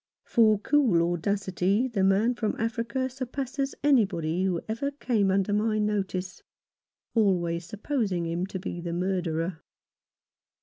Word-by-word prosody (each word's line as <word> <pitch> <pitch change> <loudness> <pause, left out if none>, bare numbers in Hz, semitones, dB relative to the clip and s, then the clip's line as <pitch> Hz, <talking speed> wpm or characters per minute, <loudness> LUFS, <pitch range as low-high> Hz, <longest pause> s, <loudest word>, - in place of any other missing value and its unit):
For 220 -2 +4
cool 200 - +2
audacity 195 +4 0
the 220 -6 -1
man 200 +5 +3
from 220 -3 -2
Africa 230 +3 -1
surpasses 265 +1 -4
anybody 190 - +2
who 180 -3 0
ever 230 +6 -2
came 240 -8 0
under 195 +1 +1
my 215 +1 +1
notice 195 -3 -2 0.4
— - - -64
always 175 -6 +1
supposing 205 -4 -1
him 170 +3 -2
to 195 - -5
be 180 -2 -5
the 170 -1 -4
murderer. 175 -2 -1
200 Hz, 130 wpm, -27 LUFS, 180-230 Hz, 0.4 s, For